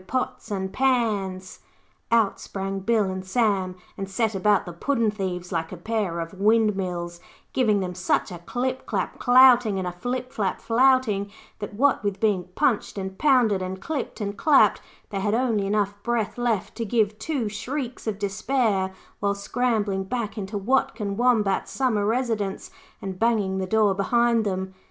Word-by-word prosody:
Pots 255 Hz, 0 st, -3 dB
and 190 Hz, -2 st, -3 dB
Pans.' 210 Hz, -8 st, 0 dB, 0.5 s
Out 225 Hz, -4 st, +3 dB
sprang 195 Hz, 0 st, -4 dB
Bill 220 Hz, +2 st, +2 dB
and 190 Hz, -1 st, -3 dB
Sam 190 Hz, -3 st, 0 dB, 0.2 s
and 195 Hz, 0 st, -5 dB
set 220 Hz, +2 st, 0 dB
about 200 Hz, +1 st, +2 dB
the 175 Hz, -, -7 dB
puddin' 230 Hz, +4 st, 0 dB
thieves 185 Hz, -3 st, -4 dB
like 165 Hz, -2 st, -2 dB
a 185 Hz, -, -6 dB
pair 200 Hz, -2 st, -2 dB
of 165 Hz, 0 st, -5 dB
windmills, 190 Hz, -5 st, +1 dB, 0.3 s
giving 215 Hz, -6 st, +2 dB
them 180 Hz, -1 st, -3 dB
such 185 Hz, +1 st, 0 dB
a 175 Hz, -, -7 dB
clip 255 Hz, +8 st, -3 dB
clap -, -, -2 dB
clouting 245 Hz, -4 st, +6 dB
and 185 Hz, -1 st, -2 dB
a -, -, -2 dB
flip 250 Hz, +8 st, -4 dB
flap 200 Hz, -3 st, -1 dB
flouting, 235 Hz, -4 st, +2 dB, 0.3 s
that 205 Hz, -1 st, -6 dB
what 270 Hz, 0 st, +2 dB
with 200 Hz, -1 st, -2 dB
being 200 Hz, -5 st, +1 dB
punched 250 Hz, -8 st, +1 dB
and 190 Hz, -1 st, -5 dB
pounded, 245 Hz, -9 st, +3 dB
and 185 Hz, +1 st, -4 dB
clipped 285 Hz, +4 st, -4 dB
and 200 Hz, -1 st, -4 dB
clapped, 295 Hz, -3 st, +5 dB, 0.3 s
they 195 Hz, -, -2 dB
had 205 Hz, +2 st, +1 dB
only 230 Hz, -5 st, +1 dB
enough 205 Hz, -1 st, +1 dB
breath 235 Hz, -1 st, -1 dB
left 235 Hz, -5 st, -1 dB
to 235 Hz, -, -2 dB
give 215 Hz, -1 st, 0 dB
two 280 Hz, -9 st, -2 dB
shrieks 245 Hz, +4 st, -5 dB
of 210 Hz, -3 st, -1 dB
despair 200 Hz, -2 st, 0 dB, 0.2 s
while 200 Hz, 0 st, 0 dB
scrambling 205 Hz, -2 st, 0 dB
back 220 Hz, +1 st, -3 dB
into 205 Hz, -1 st, -4 dB
Watkin 210 Hz, -2 st, 0 dB
Wombat's 220 Hz, -4 st, +2 dB
Summer 220 Hz, -6 st, 0 dB
Residence, 225 Hz, -4 st, -1 dB, 0.3 s
and 190 Hz, -2 st, -5 dB
banging 210 Hz, -5 st, +1 dB
the 190 Hz, -, -2 dB
door 215 Hz, 0 st, +3 dB
behind 235 Hz, +3 st, +2 dB
them. 190 Hz, -1 st, -3 dB
210 Hz, 165 wpm, -25 LUFS, 190-235 Hz, 0.5 s, clouting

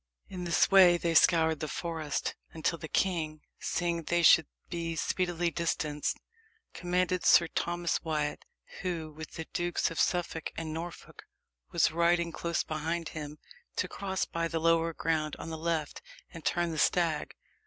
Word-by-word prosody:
In 180 Hz, -2 st, -5 dB
this 170 Hz, +2 st, +3 dB
way 185 Hz, -3 st, +8 dB
they 170 Hz, -1 st, -1 dB
scoured 160 Hz, -1 st, +4 dB
the 155 Hz, -, -3 dB
forest, 160 Hz, -3 st, -3 dB, 0.2 s
until 165 Hz, +1 st, -1 dB
the 160 Hz, -, -6 dB
king, 155 Hz, -4 st, 0 dB, 0.2 s
seeing 170 Hz, -1 st, -1 dB
they 175 Hz, +2 st, 0 dB
should 165 Hz, -2 st, +7 dB, 0.2 s
be 165 Hz, -1 st, -3 dB
speedily 175 Hz, 0 st, 0 dB
distanced, 155 Hz, -3 st, -1 dB, 0.6 s
commanded 180 Hz, 0 st, 0 dB
Sir 170 Hz, -, +6 dB
Thomas 175 Hz, 0 st, -1 dB
Wyat, 150 Hz, -2 st, -2 dB, 0.4 s
who, 170 Hz, -4 st, -3 dB
with 155 Hz, +1 st, -9 dB
the 160 Hz, -, -5 dB
Dukes 175 Hz, 0 st, 0 dB
of 165 Hz, -, -5 dB
Suffolk 175 Hz, -2 st, 0 dB
and 160 Hz, -1 st, -4 dB
Norfolk, 170 Hz, +2 st, -8 dB, 0.5 s
was -, -, +3 dB
riding 170 Hz, +1 st, +2 dB
close 170 Hz, 0 st, -1 dB
behind 160 Hz, +1 st, -3 dB
him, 150 Hz, -1 st, -7 dB, 0.4 s
to -, -, 0 dB
cross 190 Hz, -1 st, -2 dB
by 165 Hz, 0 st, -2 dB
the 165 Hz, 0 st, -2 dB
lower 165 Hz, 0 st, +3 dB
ground 155 Hz, -2 st, -1 dB
on 165 Hz, -, -7 dB
the -, -, -3 dB
left, 160 Hz, -2 st, -2 dB, 0.3 s
and 165 Hz, -, -9 dB
turn 175 Hz, -1 st, 0 dB
the 160 Hz, -, -3 dB
stag. 165 Hz, -3 st, +1 dB
165 Hz, 155 wpm, -30 LUFS, 160-175 Hz, 0.6 s, way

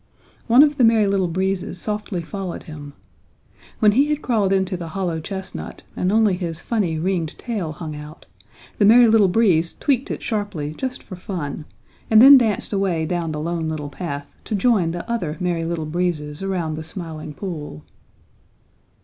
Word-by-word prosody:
One 245 Hz, +4 st, +7 dB
of 295 Hz, -1 st, +2 dB
the 255 Hz, -, +3 dB
Merry 225 Hz, -2 st, +5 dB
Little 195 Hz, -2 st, +1 dB
Breezes 190 Hz, +1 st, -2 dB
softly 210 Hz, -4 st, -3 dB
followed 190 Hz, 0 st, -6 dB
him. 145 Hz, -2 st, -9 dB, 0.8 s
When 210 Hz, -1 st, +5 dB
he 270 Hz, +7 st, +3 dB
had 300 Hz, 0 st, -1 dB
crawled 215 Hz, -6 st, +1 dB
into 190 Hz, -1 st, +1 dB
the 175 Hz, -2 st, -6 dB
hollow 170 Hz, -1 st, -2 dB
chestnut 190 Hz, +4 st, -6 dB
and 180 Hz, -, 0 dB
only 215 Hz, -2 st, +4 dB
his 170 Hz, -3 st, -4 dB
funny, 195 Hz, -9 st, -1 dB
ringed 170 Hz, -1 st, -2 dB
tail 210 Hz, -10 st, -3 dB
hung 155 Hz, -1 st, -7 dB
out, 150 Hz, +1 st, -10 dB, 0.5 s
the 205 Hz, -, +5 dB
Merry 235 Hz, +3 st, +7 dB
Little 220 Hz, -3 st, +5 dB
Breezes 180 Hz, -5 st, +2 dB
tweaked 270 Hz, -3 st, 0 dB
it -, -, -5 dB
sharply 205 Hz, -9 st, -3 dB
just 260 Hz, +4 st, -4 dB
for 185 Hz, -, -9 dB
fun, 170 Hz, -5 st, -5 dB, 0.4 s
and 220 Hz, -, +7 dB
then 275 Hz, +4 st, +10 dB
danced 225 Hz, -5 st, +2 dB
away 185 Hz, -5 st, 0 dB
down 170 Hz, -1 st, -2 dB
the 150 Hz, -, -4 dB
Lone 165 Hz, 0 st, -2 dB
Little 150 Hz, -2 st, -4 dB
Path 145 Hz, -2 st, -6 dB
to 215 Hz, -, -2 dB
join 200 Hz, -4 st, +2 dB
the 170 Hz, +1 st, -5 dB
other 175 Hz, -10 st, -2 dB
Merry 175 Hz, -2 st, -1 dB
Little 165 Hz, -1 st, -2 dB
Breezes 155 Hz, -2 st, -2 dB
around 175 Hz, -5 st, -2 dB
the 160 Hz, -, -5 dB
Smiling 160 Hz, -3 st, -7 dB
Pool. 150 Hz, -, -6 dB
180 Hz, 175 wpm, -21 LUFS, 160-210 Hz, 0.8 s, then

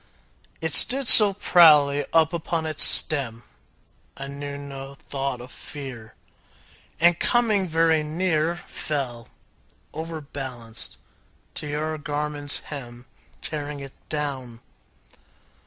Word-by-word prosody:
It 160 Hz, -2 st, -4 dB
stood 265 Hz, -, +5 dB
so 210 Hz, -3 st, +11 dB
proudly 150 Hz, -7 st, +3 dB
up 165 Hz, 0 st, +1 dB
upon 165 Hz, -1 st, -4 dB
its 155 Hz, -1 st, +2 dB
stem, 120 Hz, -6 st, +4 dB, 0.7 s
I 135 Hz, -, -8 dB
knew 140 Hz, 0 st, -8 dB
no 140 Hz, -1 st, -10 dB
thought 135 Hz, -2 st, -6 dB
of 125 Hz, +3 st, -13 dB
fear, 130 Hz, -7 st, -11 dB, 0.8 s
And 170 Hz, +1 st, +2 dB
coming 220 Hz, -6 st, 0 dB
very 160 Hz, -1 st, 0 dB
near 160 Hz, +1 st, -2 dB
Fell, 130 Hz, -9 st, -7 dB, 0.7 s
overbalanced, 140 Hz, -7 st, -8 dB, 0.6 s
to 150 Hz, -, -3 dB
your 155 Hz, +1 st, -5 dB
garment's 145 Hz, 0 st, -3 dB
hem, 120 Hz, -3 st, -11 dB, 0.4 s
Tearing 150 Hz, -1 st, -6 dB
it 135 Hz, -1 st, -11 dB, 0.2 s
down. 135 Hz, -6 st, -6 dB
145 Hz, 105 wpm, -22 LUFS, 135-160 Hz, 0.8 s, so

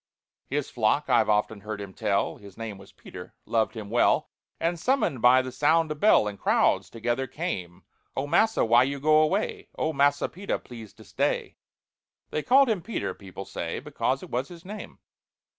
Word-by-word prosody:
His -, -, -2 dB
flock, -, -, +1 dB
I've -, -, +4 dB
often 105 Hz, 0 st, +1 dB
heard 105 Hz, 0 st, -5 dB
him 100 Hz, -2 st, -8 dB
tell, 100 Hz, -2 st, 0 dB
(His 100 Hz, -2 st, -14 dB
name 110 Hz, -4 st, -6 dB
was -, -, -15 dB
PETER) 90 Hz, 0 st, -11 dB
loved 115 Hz, +1 st, 0 dB
him 105 Hz, -2 st, -7 dB
well, 120 Hz, -, +2 dB, 0.3 s
And, 170 Hz, +1 st, -1 dB
summoned 250 Hz, -, 0 dB
by 130 Hz, +1 st, +6 dB
the 130 Hz, -, -6 dB
sound 155 Hz, +4 st, +2 dB
of 150 Hz, -, -5 dB
bell, 205 Hz, -, +5 dB
In 100 Hz, -1 st, -5 dB
crowds -, -, +2 dB
together 120 Hz, +3 st, -2 dB
came. 105 Hz, -, -5 dB, 0.3 s
"Oh, 135 Hz, -, 0 dB
massa, 220 Hz, -, +3 dB
why 115 Hz, +2 st, +5 dB
you 140 Hz, +2 st, 0 dB
go 155 Hz, +2 st, +5 dB
away? 185 Hz, +7 st, -1 dB
Oh, 160 Hz, -, 0 dB
MASSA 145 Hz, 0 st, +2 dB
PETER, 195 Hz, +4 st, -3 dB
please 115 Hz, -4 st, -11 dB
to -, -, -15 dB
stay." -, -, -2 dB, 0.8 s
(They 155 Hz, -, -1 dB
called 270 Hz, -, +5 dB
him 215 Hz, -6 st, 0 dB
PETER, 225 Hz, +5 st, -3 dB
people 95 Hz, 0 st, -10 dB
say, -, -, -4 dB
Because -, -, -2 dB
it -, -, -11 dB
was 125 Hz, +3 st, -1 dB
his 170 Hz, -1 st, -13 dB
name.) 210 Hz, +3 st, -8 dB
130 Hz, 185 wpm, -26 LUFS, 110-165 Hz, 0.8 s, by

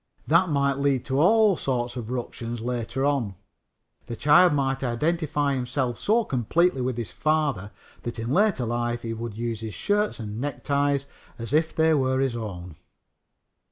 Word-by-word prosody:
That 170 Hz, +3 st, +3 dB
might 140 Hz, -2 st, +1 dB
lead 140 Hz, -3 st, +1 dB
to 135 Hz, 0 st, 0 dB
all 210 Hz, +2 st, +5 dB
sorts 125 Hz, -4 st, -2 dB
of 120 Hz, -3 st, -6 dB
ructions 120 Hz, -1 st, -4 dB
later 120 Hz, +2 st, -2 dB
on. 130 Hz, -9 st, 0 dB, 0.7 s
The 120 Hz, -, -5 dB
child 150 Hz, +9 st, +5 dB
might 135 Hz, -2 st, 0 dB
identify 145 Hz, +3 st, 0 dB
himself 125 Hz, -1 st, -2 dB
so 230 Hz, +3 st, +2 dB
completely 135 Hz, -, +1 dB
with 125 Hz, -1 st, -2 dB
his 115 Hz, -7 st, -4 dB
father 145 Hz, -5 st, 0 dB, 0.3 s
that 120 Hz, -, -5 dB
in 115 Hz, +2 st, -3 dB
later 190 Hz, -, +2 dB
life 120 Hz, 0 st, -2 dB
he 115 Hz, -1 st, -3 dB
would 115 Hz, -1 st, -6 dB
use 115 Hz, -2 st, -3 dB
his 110 Hz, -2 st, -6 dB
shirts 210 Hz, -4 st, 0 dB
and 110 Hz, +1 st, -5 dB
neckties 140 Hz, 0 st, 0 dB, 0.3 s
as 115 Hz, +3 st, -6 dB
if 160 Hz, +1 st, +2 dB
they 160 Hz, 0 st, +4 dB
were 130 Hz, -2 st, +1 dB
his 135 Hz, -3 st, 0 dB
own. 90 Hz, -8 st, -7 dB
130 Hz, 160 wpm, -25 LUFS, 120-150 Hz, 0.7 s, all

